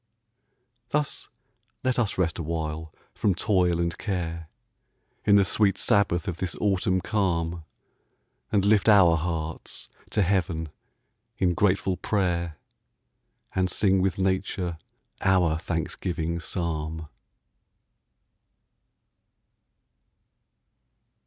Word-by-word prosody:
Thus 150 Hz, -1 st, -2 dB, 0.5 s
let 130 Hz, -1 st, +1 dB
us 110 Hz, -5 st, 0 dB
rest 85 Hz, -3 st, 0 dB
awhile 80 Hz, -1 st, -3 dB, 0.2 s
from 100 Hz, -4 st, +1 dB
toil 90 Hz, -3 st, +2 dB
and 85 Hz, -1 st, 0 dB
care, 85 Hz, -5 st, -3 dB, 0.8 s
In 100 Hz, -, +6 dB
the 100 Hz, -1 st, +5 dB
sweet 100 Hz, -1 st, +2 dB
sabbath 100 Hz, -2 st, +2 dB
of 90 Hz, -3 st, -2 dB
this 90 Hz, -1 st, -2 dB
autumn 95 Hz, -2 st, +1 dB
calm, 85 Hz, -5 st, -1 dB, 0.9 s
And 100 Hz, -2 st, +2 dB
lift 105 Hz, +1 st, +4 dB
our 95 Hz, -5 st, +7 dB
hearts 80 Hz, -1 st, -4 dB, 0.2 s
to 105 Hz, -, +2 dB
heaven 90 Hz, -4 st, 0 dB, 0.7 s
in 90 Hz, -3 st, +2 dB
grateful 95 Hz, 0 st, +1 dB
prayer, 85 Hz, -6 st, -1 dB, 1.0 s
And 95 Hz, -1 st, +1 dB
sing 95 Hz, 0 st, +2 dB
with 95 Hz, -1 st, 0 dB
nature 95 Hz, -3 st, -1 dB, 0.4 s
our 90 Hz, -4 st, +3 dB
thanksgiving 85 Hz, 0 st, -2 dB
psalm. 80 Hz, -2 st, -3 dB
90 Hz, 95 wpm, -26 LUFS, 85-95 Hz, 1.0 s, our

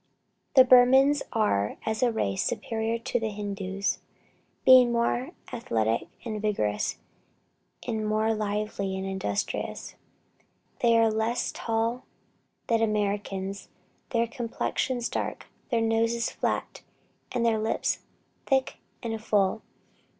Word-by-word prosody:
The 260 Hz, -, +10 dB
Burmans 265 Hz, +3 st, +6 dB
are, 105 Hz, -, +1 dB
as 220 Hz, 0 st, -1 dB
a 245 Hz, -1 st, +3 dB
race, 100 Hz, -, -1 dB
superior 225 Hz, 0 st, -1 dB
to 245 Hz, +1 st, -2 dB
the 225 Hz, -1 st, -2 dB
Hindoos, 200 Hz, -1 st, -3 dB, 0.7 s
being 255 Hz, -2 st, +8 dB
more 240 Hz, +6 st, 0 dB, 0.2 s
athletic 115 Hz, -, 0 dB, 0.2 s
and 215 Hz, -3 st, -3 dB
vigorous, 105 Hz, -, 0 dB, 0.9 s
and 220 Hz, -3 st, -2 dB
more 215 Hz, +1 st, +2 dB
lively 210 Hz, -2 st, -2 dB
and 190 Hz, -, -4 dB
industrious. 190 Hz, -, -3 dB, 0.9 s
They 230 Hz, -1 st, +4 dB
are 225 Hz, -1 st, +4 dB
less 220 Hz, +2 st, 0 dB
tall 230 Hz, +2 st, -1 dB, 0.6 s
than 230 Hz, -1 st, +2 dB
Americans, 200 Hz, -2 st, -1 dB, 0.4 s
their 235 Hz, -1 st, +2 dB
complexions 240 Hz, +1 st, -2 dB
dark, -, -, -3 dB, 0.2 s
their 235 Hz, -3 st, +1 dB
noses 230 Hz, +1 st, +1 dB
flat, -, -, -2 dB, 0.5 s
and 240 Hz, -2 st, 0 dB
their 225 Hz, -1 st, +2 dB
lips 220 Hz, +1 st, 0 dB, 0.5 s
thick 265 Hz, -1 st, +1 dB, 0.3 s
and 225 Hz, -2 st, -4 dB
full. 205 Hz, 0 st, +2 dB
225 Hz, 115 wpm, -27 LUFS, 205-235 Hz, 0.9 s, The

